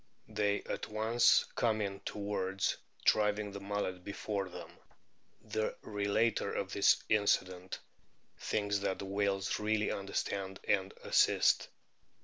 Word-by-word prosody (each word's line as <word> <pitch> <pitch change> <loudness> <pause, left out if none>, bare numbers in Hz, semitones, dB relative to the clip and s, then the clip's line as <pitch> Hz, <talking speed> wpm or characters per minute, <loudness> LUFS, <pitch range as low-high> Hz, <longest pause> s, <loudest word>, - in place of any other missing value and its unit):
They 105 -1 0
at - - -4
once 110 +2 +4
come 110 -2 +1
in 100 -2 -2
towards, 100 -2 -2 0.3
driving 105 -1 +3
the 100 - -6
mullet 100 -2 -3
before 100 -1 -3
them." - - -9 0.7
The 110 0 -2
relator 105 +2 0
of - - -3
this - - +4
incident 95 -3 +1 0.6
thinks 105 -1 0
that 95 -1 -1
the - - -6
whales 100 0 0
really 105 0 +1
understand 100 0 -3
and 95 -1 +2
assist. - - +4
100 Hz, 120 wpm, -33 LUFS, 95-105 Hz, 0.7 s, once